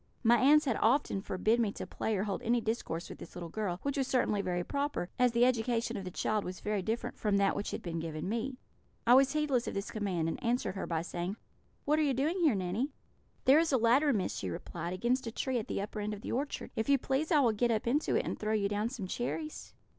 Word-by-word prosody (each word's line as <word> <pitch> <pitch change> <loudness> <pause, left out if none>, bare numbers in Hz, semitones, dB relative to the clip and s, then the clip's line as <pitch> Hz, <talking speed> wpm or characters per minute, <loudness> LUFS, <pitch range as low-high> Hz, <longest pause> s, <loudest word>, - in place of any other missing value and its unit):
My 235 +1 +6
aunts 300 +3 +6
had 255 -5 +1
often 225 -4 +2
forbid 215 +5 +1
me 220 -4 +2
to - - -6
play 220 -2 -2
or 190 - 0
hold 205 +1 -3
any 240 0 +2
discourse 220 -7 -3
with - - -10
this - - -11
little 175 -2 -6
girl, 195 -2 -2
which 280 0 -1
was 270 -2 +1
certainly 215 -6 +1
very 175 -2 -1
proper, 280 -7 -2
as 250 -1 +5
the 235 +1 +4
education 240 -1 +1
of 195 - -5
the - - -3
child 210 +3 -1
was 180 0 -6
very 210 -1 -1
different 225 +5 -3
from 205 -2 +2
that 200 0 +2
which 205 - -3
had - - -5
been 170 -2 -3
given 160 +1 -4
me. 235 +5 -2 0.5
I 240 - +6
was 270 +2 +6
heedless 290 -6 +1
of - - -4
this 200 0 -3
command, 190 -7 -1
and 165 - -4
answered 240 -3 0
her 195 - -4
by 165 -1 -1
saying: 175 +3 -3 0.5
'What 300 +2 +3
are - - +3
you 280 -4 +2
doing 310 +8 0
here, 310 -10 +4
Nanny?' 195 +8 -1 0.6
"'There 275 +4 +7
is 330 -1 +1
a 265 - +4
ladder, 255 +6 +4
Miss,' 205 -7 -1
she 95 - -3
replied, 170 - -5
'against 240 +6 0
a - - -3
tree 255 +2 -1
at 215 - -6
the - - -2
upper 210 +1 -6
end 210 0 -2
of 205 - -11
the - - -5
orchard. 280 +4 -3
If 220 - -1
you 280 - +6
please, 270 +5 -1
I 305 - +6
will 240 -4 +4
get 235 +3 +1
up 220 -2 0
into 275 +6 +1
it - - +1
and - - -3
throw 215 0 -1
you 205 -2 +2
down 210 +2 -1
some 235 -6 -5
cherries.' 300 - -4
225 Hz, 260 wpm, -32 LUFS, 195-260 Hz, 0.6 s, There